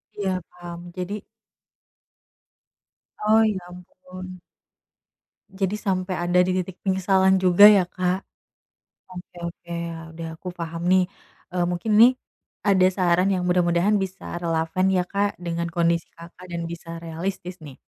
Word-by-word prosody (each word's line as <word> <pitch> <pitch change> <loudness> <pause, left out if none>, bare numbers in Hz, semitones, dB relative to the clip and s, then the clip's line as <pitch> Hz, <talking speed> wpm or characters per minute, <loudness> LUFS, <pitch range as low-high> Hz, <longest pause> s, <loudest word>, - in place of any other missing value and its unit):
Iya 200 -2 -2 0.2
paham, 175 -1 -9 0.2
jadi 180 +2 -4 2.1
Oh 220 +1 +5
ya 215 -3 +1
ampun. 185 +1 -11 1.1
Jadi 195 0 -2
sampai 185 -2 -1
ada 175 +1 +2
di 185 - 0
titik 185 0 -5
penyesalan 190 0 +3
juga 185 +1 +5
ya 195 -4 +4
Kak, 180 +1 -1 0.9
oke 180 0 -11
oke 170 0 -10 0.4
udah 165 0 -7
aku 175 - -11
paham 170 -1 -6
nih, 185 0 +5 0.5
eee, 180 - +2
mungkin 175 +5 -2
nih, 230 +4 +8 0.6
ada 190 -2 +5
saran 180 0 +2
yang 180 -2 0
mudah-mudahan 180 +3 +3
bisa 190 -2 -4
relevan 165 +1 0
ya 185 -1 +2
Kak, 200 0 -1
dengan 170 -1 -3
kondisi 170 0 +1
Kakak, 175 +2 -13
dan 170 -1 -3
bisa 165 0 -7
realistis 175 +2 -5
nih, 140 -4 -11
180 Hz, 130 wpm, -24 LUFS, 170-190 Hz, 2.1 s, nih